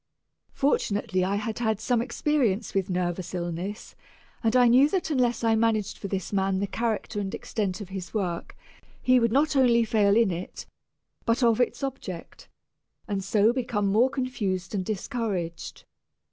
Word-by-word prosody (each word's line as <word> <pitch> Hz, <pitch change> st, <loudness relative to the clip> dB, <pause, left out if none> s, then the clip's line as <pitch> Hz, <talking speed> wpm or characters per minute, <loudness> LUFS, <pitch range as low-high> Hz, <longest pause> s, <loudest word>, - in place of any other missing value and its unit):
Fortunately 205 Hz, -8 st, +1 dB
I 195 Hz, +2 st, 0 dB
had 215 Hz, +2 st, -3 dB
had 220 Hz, -3 st, 0 dB
some 235 Hz, +1 st, +1 dB
experience 240 Hz, -5 st, 0 dB
with 195 Hz, -1 st, 0 dB
nervous 180 Hz, 0 st, -2 dB
illness, 175 Hz, +4 st, -4 dB, 0.5 s
and 225 Hz, +1 st, +2 dB
I 250 Hz, -1 st, +6 dB
knew 260 Hz, +5 st, +6 dB
that 365 Hz, -3 st, -1 dB
unless 245 Hz, -4 st, +1 dB
I 225 Hz, -1 st, +3 dB
managed 220 Hz, -2 st, +1 dB
for 200 Hz, -, -5 dB
this 195 Hz, 0 st, -4 dB
man 195 Hz, -1 st, +1 dB
the 200 Hz, -, 0 dB
character 220 Hz, 0 st, -2 dB
and 195 Hz, -1 st, -3 dB
extent 200 Hz, -3 st, -3 dB
of 195 Hz, -, -8 dB
his 190 Hz, -2 st, -6 dB
work, 180 Hz, -6 st, -3 dB, 0.4 s
he 255 Hz, 0 st, +4 dB
would 230 Hz, -1 st, +2 dB
not 290 Hz, +4 st, +2 dB
only 240 Hz, -3 st, +4 dB
fail 210 Hz, -2 st, +3 dB
in 230 Hz, -4 st, +4 dB
it, 175 Hz, +1 st, -6 dB, 0.6 s
but 230 Hz, +3 st, +1 dB
of 230 Hz, 0 st, +4 dB
its 245 Hz, -, -1 dB
object, 240 Hz, -11 st, -6 dB, 0.6 s
and 200 Hz, -2 st, -2 dB
so 210 Hz, +3 st, +3 dB
become 230 Hz, -5 st, -1 dB
more 235 Hz, +6 st, +4 dB
confused 210 Hz, -9 st, -3 dB
and 195 Hz, -2 st, -1 dB
discouraged. 195 Hz, -5 st, -4 dB
215 Hz, 160 wpm, -26 LUFS, 190-240 Hz, 0.6 s, I